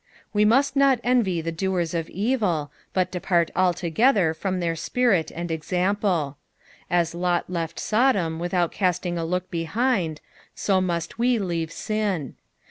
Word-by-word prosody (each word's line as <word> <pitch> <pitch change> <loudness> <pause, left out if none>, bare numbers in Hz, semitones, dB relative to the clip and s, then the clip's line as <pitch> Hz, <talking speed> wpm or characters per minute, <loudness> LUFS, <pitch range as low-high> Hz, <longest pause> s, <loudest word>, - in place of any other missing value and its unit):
'''' - - -32
Wo 210 0 +3
must 270 +5 +3
not 275 -3 +4
envy 230 -9 +2
the 165 +1 -3
doers 175 -1 -1
of 165 -1 -2
evil, 195 - 0 0.2
bat 185 -1 0
depart 175 -2 +1
altogether 180 - +2
from 185 +2 -2
their 170 -1 -1
spirit 200 -2 +1
and 170 0 -5
example. 180 -2 0 0.5
As 170 -1 +1
Lot 175 0 0
left 165 -3 -3
Sodom 205 -9 +1
vithom 175 0 0
casting 180 -2 -1
a - - -2
look 180 +2 -2
behind, 175 - 0 0.4
so 190 -2 +1
must 175 +2 -2
we 245 0 +3
leave 170 -5 -2 0.2
rin. 205 - -1
180 Hz, 145 wpm, -24 LUFS, 165-210 Hz, 0.5 s, not